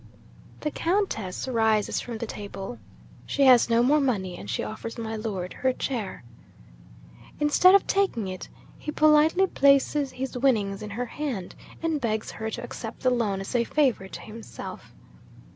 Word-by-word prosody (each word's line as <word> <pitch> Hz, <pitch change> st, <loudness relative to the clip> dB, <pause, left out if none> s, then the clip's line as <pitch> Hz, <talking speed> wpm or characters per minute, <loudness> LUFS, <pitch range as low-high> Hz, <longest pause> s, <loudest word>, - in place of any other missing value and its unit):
'The 300 Hz, -, -1 dB
Countess 330 Hz, -, -1 dB
rises 220 Hz, -4 st, +1 dB
from 235 Hz, -2 st, -6 dB
the 230 Hz, -, -4 dB
table. 195 Hz, -, -7 dB, 0.5 s
She 280 Hz, -, +1 dB
has 250 Hz, -3 st, +7 dB
no 230 Hz, +1 st, +4 dB
more 295 Hz, +4 st, +4 dB
money, 195 Hz, -9 st, -1 dB
and 100 Hz, -, -9 dB
she -, -, -1 dB
offers 225 Hz, +2 st, -6 dB
my 225 Hz, -1 st, -4 dB
Lord 200 Hz, -5 st, -4 dB
her 260 Hz, 0 st, +1 dB
chair. 230 Hz, -, -4 dB, 1.2 s
'Instead 305 Hz, +6 st, +6 dB
of 400 Hz, -, +4 dB
taking 380 Hz, -, +1 dB
it, 185 Hz, 0 st, -6 dB, 0.3 s
he -, -, -7 dB
politely 310 Hz, +5 st, +5 dB
places 280 Hz, -3 st, +3 dB
his 260 Hz, 0 st, -5 dB
winnings 215 Hz, -7 st, +1 dB
in 210 Hz, -, -6 dB
her 235 Hz, +5 st, -3 dB
hand, 245 Hz, -7 st, -4 dB, 0.3 s
and 320 Hz, -3 st, 0 dB
begs 220 Hz, -2 st, -1 dB
her 220 Hz, 0 st, -4 dB
to -, -, -5 dB
accept -, -, -7 dB
the 255 Hz, -, +3 dB
loan 210 Hz, -6 st, 0 dB
as 195 Hz, -, -6 dB
a 240 Hz, -1 st, +3 dB
favour 255 Hz, -7 st, +1 dB
to -, -, -9 dB
himself. 220 Hz, +1 st, -9 dB
235 Hz, 160 wpm, -26 LUFS, 210-280 Hz, 1.2 s, has